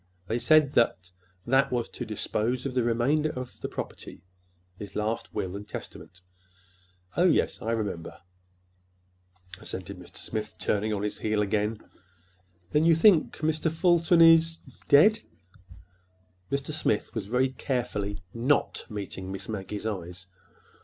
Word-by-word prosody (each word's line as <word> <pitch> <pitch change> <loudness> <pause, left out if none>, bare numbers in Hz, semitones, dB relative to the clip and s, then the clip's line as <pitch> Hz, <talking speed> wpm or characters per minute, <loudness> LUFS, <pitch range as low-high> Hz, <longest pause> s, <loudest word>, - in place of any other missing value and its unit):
They 115 +2 -1
said 155 0 +4
that 95 -6 +1 0.3
that 135 +2 +3
was 120 -2 -1
to - - -7
dispose 125 +4 -2
of 135 - -2
the 125 - +2
remainder 120 +7 +1
of 125 -4 -7
the - - -3
property—his 90 +2 -10
last 110 +2 -2
will 95 0 -3
and 100 +1 -7
testament." 90 -2 -9 0.9
"Oh, 175 - +3
yes, 175 - +2
I 110 - -3
remember," 105 -7 -3 1.4
assented 95 0 -7
Mr. 90 - -12
Smith, 110 -1 -5
turning 105 +1 0
on 105 -1 -2
his 105 - -3
heel 105 -1 +1
again. 105 +1 -1 0.9
"Then 150 - +3
you 165 0 +5
think—Mr. 160 -3 +3
Fulton 170 0 +3
is—dead?" 165 - +5 1.3
Mr. 140 +2 -2
Smith 110 -8 -1
was 105 -4 -4
very 125 +4 +2
carefully 120 -6 -3 0.2
not 125 +5 0
meeting 95 -3 -6
Miss 95 0 -6
Maggie's 105 0 -5
eyes. 90 -3 -5
115 Hz, 125 wpm, -27 LUFS, 100-145 Hz, 1.4 s, you